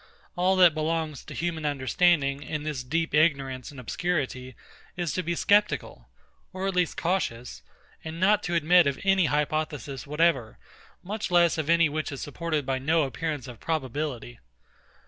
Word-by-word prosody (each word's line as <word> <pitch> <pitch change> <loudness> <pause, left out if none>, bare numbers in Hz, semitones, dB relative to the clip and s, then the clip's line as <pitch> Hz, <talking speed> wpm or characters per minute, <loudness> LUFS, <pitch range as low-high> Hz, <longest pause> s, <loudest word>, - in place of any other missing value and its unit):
All 185 +2 +2
that 180 -3 +6
belongs 155 -2 -2
to - - -9
human 165 -2 -3
understanding, 145 0 +1
in 150 +2 -4
this 150 -4 -3
deep 165 +6 -1
ignorance 140 -4 +1
and 140 -3 -11
obscurity, 130 -3 -3 0.4
is 175 -5 -2
to 185 - -1
be 170 -1 -2
sceptical, 205 +4 +1 0.4
or 190 0 -4
at 195 - 0
least 180 -2 0
cautious, 125 - -2 0.4
and 160 +1 -6
not 205 +3 +4
to 175 - -1
admit 170 0 +5
of 140 -1 -1
any 195 -2 +3
hypothesis 150 -2 -2
whatever, 150 -6 +1 0.5
much 210 +3 -4
less 175 -2 +3
of 155 0 -3
any 170 -1 +5
which 155 +1 -3
is 135 - -6
supported 155 -1 -3
by 135 0 -1
no 155 +4 +2
appearance 145 0 -4
of 120 -3 -10
probability. 135 -5 -3
155 Hz, 160 wpm, -26 LUFS, 135-170 Hz, 0.5 s, that